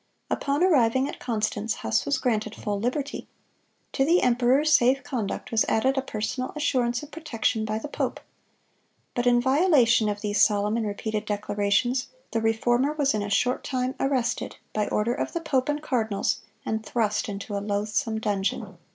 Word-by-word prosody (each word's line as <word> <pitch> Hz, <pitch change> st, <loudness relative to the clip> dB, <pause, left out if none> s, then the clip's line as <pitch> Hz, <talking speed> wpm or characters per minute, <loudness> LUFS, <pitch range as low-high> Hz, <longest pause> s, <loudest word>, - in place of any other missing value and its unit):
Upon 285 Hz, +4 st, 0 dB
arriving 260 Hz, -7 st, +3 dB
at -, -, -7 dB
Constance, 220 Hz, -2 st, -1 dB
Huss 110 Hz, 0 st, -1 dB
was 285 Hz, -1 st, +2 dB
granted 220 Hz, -4 st, -1 dB
full 205 Hz, -1 st, -3 dB
liberty. 270 Hz, +6 st, -3 dB, 0.7 s
To 270 Hz, -, +2 dB
the 335 Hz, +6 st, +3 dB
emperor's 255 Hz, +5 st, +3 dB
safe 260 Hz, +2 st, +4 dB
conduct 225 Hz, -7 st, -4 dB
was 225 Hz, -1 st, +3 dB
added 260 Hz, +5 st, +2 dB
a 270 Hz, -, +1 dB
personal 255 Hz, +1 st, -3 dB
assurance 245 Hz, -4 st, 0 dB
of 295 Hz, -, -11 dB
protection 235 Hz, -8 st, -1 dB
by 215 Hz, 0 st, -2 dB
the 220 Hz, -, -5 dB
pope. -, -, -3 dB, 0.9 s
But 245 Hz, 0 st, 0 dB
in 240 Hz, 0 st, +5 dB
violation 260 Hz, -, +4 dB
of 205 Hz, 0 st, -3 dB
these 210 Hz, -1 st, 0 dB
solemn 210 Hz, 0 st, +3 dB
and 225 Hz, -2 st, -1 dB
repeated 215 Hz, +1 st, -3 dB
declarations, 205 Hz, +5 st, 0 dB, 0.2 s
the 225 Hz, -, 0 dB
Reformer 240 Hz, +5 st, +2 dB
was 290 Hz, -3 st, +1 dB
in 215 Hz, -, -1 dB
a 205 Hz, -, -3 dB
short 250 Hz, +5 st, +1 dB
time 255 Hz, -1 st, -1 dB
arrested, 255 Hz, -3 st, -1 dB, 0.2 s
by 210 Hz, -1 st, 0 dB
order 225 Hz, +3 st, 0 dB
of -, -, -3 dB
the 340 Hz, -, -1 dB
pope 275 Hz, -4 st, 0 dB
and 295 Hz, +1 st, -1 dB
cardinals, 225 Hz, -8 st, 0 dB, 0.2 s
and 220 Hz, 0 st, -2 dB
thrust 220 Hz, -1 st, -1 dB
into 200 Hz, +1 st, -5 dB
a 200 Hz, -, -1 dB
loathsome 215 Hz, +3 st, -1 dB
dungeon. 205 Hz, -3 st, -2 dB
235 Hz, 170 wpm, -26 LUFS, 215-270 Hz, 0.9 s, in